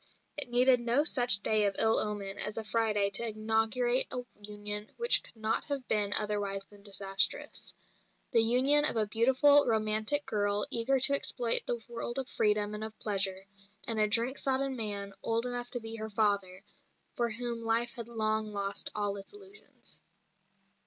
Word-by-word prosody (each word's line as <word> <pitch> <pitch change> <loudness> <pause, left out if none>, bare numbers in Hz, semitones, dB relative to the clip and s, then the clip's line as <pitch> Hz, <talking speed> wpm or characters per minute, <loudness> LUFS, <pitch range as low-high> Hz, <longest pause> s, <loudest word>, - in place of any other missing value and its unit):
It 290 -4 -3
needed 250 +1 +5
no 240 +4 +2
such 245 -9 +3
day 215 -1 +3
of 195 - -2
ill 220 0 +5
omen 205 -2 -2
as 210 +1 -3
a 225 - -3
Friday 210 -2 0
to 230 +4 -1
inaugurate 225 +3 +1
a 250 - -5 0.2
union 210 0 -5
which 475 +1 +4
could - - -12
not 220 0 -2
have 280 -3 -5
been 205 -2 +1
otherwise 205 -2 0
than 205 0 -19
disastrous 195 -1 -2 0.6
the 230 - +4
union 260 +6 +3
of 300 - +2
a 220 -1 +1
beautiful, 265 +7 +4
romantic 220 +5 +1
girl 205 -1 0
eager 265 +2 +1
to 275 +2 +4
exploit 245 -4 +1
the 240 -1 -2
world 240 +1 -5
of 265 -1 -3
freedom 210 0 0
and 210 +1 -5
of 220 0 -7
pleasure, 195 -2 0 0.4
and 225 -2 -1
a 215 - +4
drink 235 +5 0
sodden 270 0 -1
man 205 -3 -1
old 230 +1 -1
enough 245 0 -3
to 245 - -4
be 225 0 -4
her 220 0 -6
father, 200 -3 0 0.5
for 235 -1 -1
whom 235 +1 -4
life 230 +1 +1
had 235 -3 -7
long 220 -2 -2
lost 200 -1 -2
all 205 -1 -2
its 195 - -9
illusions. 410 0 -10
220 Hz, 175 wpm, -30 LUFS, 210-245 Hz, 0.6 s, needed